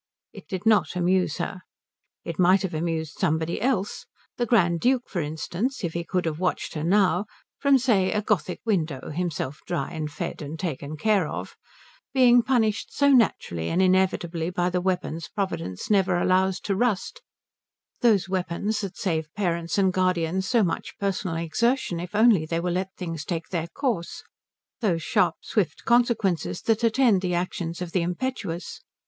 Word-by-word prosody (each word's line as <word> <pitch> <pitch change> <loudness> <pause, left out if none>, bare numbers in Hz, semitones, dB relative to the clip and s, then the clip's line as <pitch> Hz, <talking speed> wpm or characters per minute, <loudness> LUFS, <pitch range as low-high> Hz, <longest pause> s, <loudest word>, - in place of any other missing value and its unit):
It - - -12
did 190 0 -5
not 220 -4 +3
amuse 180 -2 +1
her. 185 +1 -4 0.6
It - - -5
might 185 +2 +5
have 190 - -3
amused 160 -1 -3
somebody 160 -2 0
else, 215 -5 -1 0.3
the 240 - 0
Grand 175 -7 +3
Duke, 250 +5 +2
for 175 - -2
instance, 175 - -3
if 170 -2 -2
he 170 - -2
could 180 +1 -1
have 160 -1 -2
watched 180 0 -1
her 155 - -3
now 190 +1 +3 0.3
(from, 280 -1 +5
say, 215 -7 +2
a 210 - 0
Gothic 195 -3 -1
window, 160 - -1
himself 155 -4 -3
dry 165 -6 -2
and 155 -3 -4
fed 145 - -5
and 150 +2 -6
taken 155 -3 -4
care 200 -1 +2
of), - - -6 0.6
being 245 -2 +6
punished 225 -4 0
so 285 0 +3
naturally 85 - +2
and 175 - 0
inevitably 185 -3 +2
by 180 0 0
the 180 0 0
weapons 180 -4 -2
Providence 185 - -4
never 190 -3 +3
allows 185 +1 +2
to 200 - -1
rust, 240 - -1 0.8
those 215 -6 +4
weapons 190 +3 -1
that 195 -3 -6
save 160 -5 -2
parents 170 -4 -1
and 190 -2 +3
guardians 185 0 0
so 225 +4 +3
much 175 - -3
personal 195 -4 -2
exertion 175 +4 0
if 175 +3 -6
only 215 -7 +5
they 165 +1 -1
will 175 0 -1
let 185 +1 -1
things 165 -4 -4
take 165 -1 -4
their 170 -2 -2
course, 215 - -3 0.6
those 175 -8 0
sharp, 175 -1 +2
swift 165 - -1
consequences 220 - +1
that 225 0 +1
attend 230 -4 +4
the 180 -2 -1
actions 175 -1 -3
of 175 - -7
the 180 - +1
impetuous. 180 -1 -4
185 Hz, 165 wpm, -25 LUFS, 165-210 Hz, 0.8 s, being